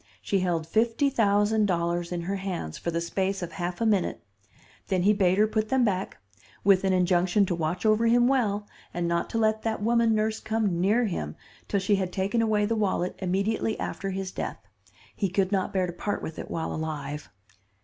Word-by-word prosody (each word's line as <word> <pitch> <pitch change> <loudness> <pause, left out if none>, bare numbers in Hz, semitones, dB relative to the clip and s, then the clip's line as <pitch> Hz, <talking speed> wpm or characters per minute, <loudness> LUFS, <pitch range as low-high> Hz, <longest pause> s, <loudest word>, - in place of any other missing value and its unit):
She 200 - 0
held 175 -3 0
fifty 230 - +1
thousand 210 -2 +3
dollars 170 -1 -1
in 175 -1 -2
her 195 +4 -2
hands 180 - -4
for - - -4
the 170 0 -1
space 190 +3 -1
of 170 - -5
half 175 -1 -4
a 230 - +1
minute; 205 -5 +1 0.6
then 185 -2 +1
he 205 +2 +5
bade 190 -2 +2
her 210 - +5
put 215 0 -1
them 260 -1 +3
back, 190 -3 -2 0.5
with 195 -1 +5
an 190 - +2
injunction 180 +2 +3
to 180 - -1
watch 170 +3 -2
over 215 +2 +4
him 240 +1 +4
well 210 -6 +1 0.3
and 175 -1 -1
not 170 0 0
to - - -2
let 220 -1 +2
that 220 -2 -2
woman 230 0 +3
nurse 215 +1 0
come 210 -6 -1
near 215 +6 +3
him 75 - -3 0.3
till 200 - +1
she 195 +1 +2
had 185 -2 -2
taken 200 +5 0
away 215 -2 +2
the 225 +2 0
wallet 190 -4 0
immediately 200 +4 -1
after 195 - -3
his 190 0 -4
death. - - -4 0.6
He 195 - 0
could 190 +1 0
not 190 -2 0
bear 185 -1 +1
to 175 - -5
part 205 +3 -3
with 160 - -6
it - - -7
while 165 -1 -3
alive. 150 -2 -5
195 Hz, 205 wpm, -27 LUFS, 175-215 Hz, 0.6 s, he